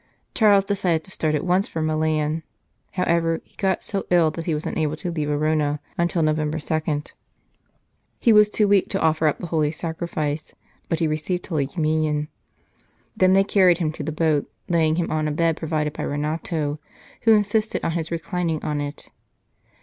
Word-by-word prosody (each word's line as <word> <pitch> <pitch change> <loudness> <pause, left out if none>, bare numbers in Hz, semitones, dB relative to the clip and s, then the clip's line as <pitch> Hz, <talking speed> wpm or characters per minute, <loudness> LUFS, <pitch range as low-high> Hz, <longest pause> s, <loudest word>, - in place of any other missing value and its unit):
Charles 205 -4 +5
decided 180 -5 0
to 190 - -11
start 155 -4 0
at 150 - -2
once 185 +2 +2
for 165 - -5
Milan; 155 0 0 0.5
however, 170 -2 +1
he - - -31
got 190 -2 0
so 200 -2 -3
ill 170 -3 +4
that 165 0 -6
he 165 - 0
was 150 - -4
unable 155 -1 -1
to 175 +2 -4
leave 155 -3 -2
Arona 150 0 +1 0.2
until 170 -1 +1
Novem 155 0 +1
ber 155 - -3
2. 155 -1 -1 1.2
He 230 - +4
was 210 0 +6
too 210 0 +2
weak 200 -2 +3
to - - -1
offer 160 0 +2
up 150 - +1
the - - -6
Holy 155 -3 +1
Sacrifice, 155 -2 -4 0.3
but 165 - +1
he 160 - +1
received 155 +4 -2
Holy 150 -6 -1
Communion. 155 -2 0 0.9
Then 185 0 +4
they 195 0 +5
carried 185 -4 +4
him 165 -4 -1
to - - -8
the 155 - -3
boat, 155 -2 0 0.2
laying 160 -3 +2
him 170 0 -1
on 155 -1 0
a - - -1
bed 165 +1 +1
provided 155 -2 -2
by - - -6
Renato, 150 0 -2 0.4
who 225 -2 +6
insisted 210 +1 0
on - - +1
his 160 -1 -3
reclining 170 -1 -2
on 150 -1 -1
it. 145 0 -6
160 Hz, 185 wpm, -23 LUFS, 155-180 Hz, 1.2 s, was